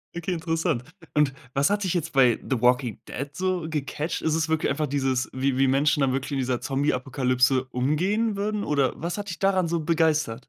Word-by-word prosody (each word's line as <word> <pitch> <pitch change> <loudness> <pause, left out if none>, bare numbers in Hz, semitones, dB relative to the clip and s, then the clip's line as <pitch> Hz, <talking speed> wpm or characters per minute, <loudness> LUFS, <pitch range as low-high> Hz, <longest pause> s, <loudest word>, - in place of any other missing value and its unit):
Okay, 180 +2 -2
interessant. 160 -5 -1 0.3
Und 150 -3 +2 0.2
was 140 +4 +2
hat 205 0 0
dich 185 - 0
jetzt 170 -2 -2
bei 125 -4 +4
The 130 -4 0
Walking 125 -1 +2
Dead 140 +2 -5
so 185 0 -1
gecatcht? 150 +2 -3
Ist 160 0 +1
es 160 0 0
wirklich 160 -1 +1
einfach 150 +2 -1
dieses, 130 -2 0
wie 130 0 -1
wie 135 0 +4
Menschen 145 +3 +2
dann 135 - +3
wirklich 135 +2 -3
in - - 0
dieser 125 -1 0
Zombieapokalypse 130 -1 +1
umgehen 185 - 0
würden 210 +1 -2
oder 140 -3 +2
was 170 +4 -3
hat 205 -1 -5
dich 170 - -6
daran 190 -3 +2
so 170 -1 0
begeistert? 155 -6 +1
150 Hz, 200 wpm, -25 LUFS, 130-170 Hz, 0.3 s, bei